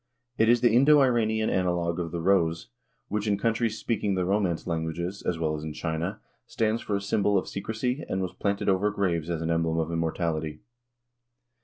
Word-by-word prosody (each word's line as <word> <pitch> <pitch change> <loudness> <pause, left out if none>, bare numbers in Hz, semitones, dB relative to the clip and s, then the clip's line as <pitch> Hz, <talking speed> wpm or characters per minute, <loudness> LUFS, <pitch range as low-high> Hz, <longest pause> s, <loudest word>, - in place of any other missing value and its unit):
It 110 +1 +4
is 120 0 +4
the 120 - +5
Indo 140 +5 +6
Iranian 110 -4 +2
analogue 90 -2 0
of 85 -1 -2
the 85 - -3
rose, 85 -3 +1 0.4
which 105 +1 -2
in 100 -1 +2
countries 115 +1 0
speaking 105 -4 -1
the 90 -1 0
romance 95 -3 0
languages, 85 +3 -3
as 85 - -1
well 80 -1 -1
as 75 - -6
in 80 -1 -5
China, 80 +5 -3 0.3
stands 110 0 0
for 105 - -2
a 100 - -1
symbol 100 0 +1
of 95 - -1
secrecy 110 +7 -3
and 95 - -1
was 95 -1 -3
planted 100 -1 -2
over 95 +1 +3
graves 90 -6 -1
as 85 -1 -2
an 80 - -1
emblem 80 0 +1
of 80 0 -1
immortality. 80 -2 -2
95 Hz, 190 wpm, -27 LUFS, 85-110 Hz, 0.4 s, Indo